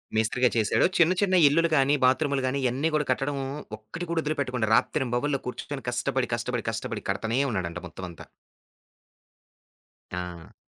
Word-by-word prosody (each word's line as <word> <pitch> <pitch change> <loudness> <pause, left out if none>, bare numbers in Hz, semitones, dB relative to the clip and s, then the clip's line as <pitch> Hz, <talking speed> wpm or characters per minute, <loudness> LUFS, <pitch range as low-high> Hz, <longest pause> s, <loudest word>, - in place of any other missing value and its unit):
మె‌స్త్రీగా 115 +3 +2
చేశాడు. 105 -2 +3
చిన్న, 170 +1 +5
చిన్న 190 -2 +3
ఇల్లులు 165 +3 +3
గాని, 140 +1 +4
బాత్రూములు 140 +1 +2
గాని, 140 +2 -1
ఇయన్నీగూడా 150 +5 +1
కట్టడం 140 +2 -1 0.4
ఒక్కటి 110 +12 -7
కూడా 165 -1 +1
వదులుపెట్టుకుండా. 135 -7 -1
రాత్రింబవళ్ళు 135 +2 +1
కూర్చుకొని 135 +1 -6
కష్టపడి, 125 +1 -1
కష్టపడి, 120 0 -3
కష్టపడి 110 -1 -4
కడతానే 110 +5 0
ఉన్నాడంట 90 -4 -3
మొత్తం 90 +3 -8
అంతా. 85 - -11 1.9
ఆ! 90 -2 -6
125 Hz, 130 wpm, -27 LUFS, 110-145 Hz, 1.9 s, చిన్న